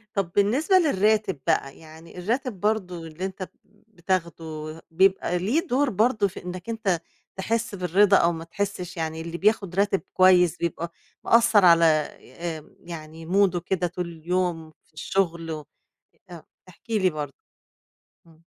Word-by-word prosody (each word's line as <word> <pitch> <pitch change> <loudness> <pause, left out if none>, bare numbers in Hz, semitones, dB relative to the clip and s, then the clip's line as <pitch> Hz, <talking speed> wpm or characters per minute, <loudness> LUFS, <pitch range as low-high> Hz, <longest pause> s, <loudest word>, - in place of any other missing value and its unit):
طَب 195 -4 -1
بالنسبة 255 - +3
للراتب 215 - +2
بقى 135 - 0
يعني 160 +2 -14
الراتب 230 +2 -2
برضه 180 -5 -1
اللي 160 +4 -6
أنت 190 0 -5 0.2
ب 210 - -30
بتاخده 165 -5 -4
بيبقى 190 0 +2
ليه 280 - 0
دور 275 +2 +2
برضه 220 0 +2
في 190 - -10
إنّك 180 +3 -7
أنت 205 -7 -1 0.3
تحس 225 +3 -2
بالرضا 195 +2 +4
أو 170 - +3
ما 165 -1 -6
تحسش، 185 0 -4
يعني 160 0 -3
اللي 170 +1 -6
بياخُد 200 -3 +1
راتب 200 0 +2
كويس 180 -2 +5
بيبقى 170 0 -3 0.3
مأثّر 230 -4 +5
على 170 -1 +7
آآ 160 +1 -1
آمم 150 - -20
يعني 160 -1 -9
موده 190 +1 +2
كده 180 0 -1
طول 180 0 -5
اليوم، 170 -1 -2 0.2
في - - -35
الشُغل 170 -1 -1
و 155 -2 -6 0.6
آآ 175 - -9
أ 160 - -13 0.2
احكِ 185 - -21
لي 205 -5 +2
برضه. 150 -4 -5 0.9
إمم. 165 0 -22
180 Hz, 150 wpm, -25 LUFS, 165-205 Hz, 0.9 s, على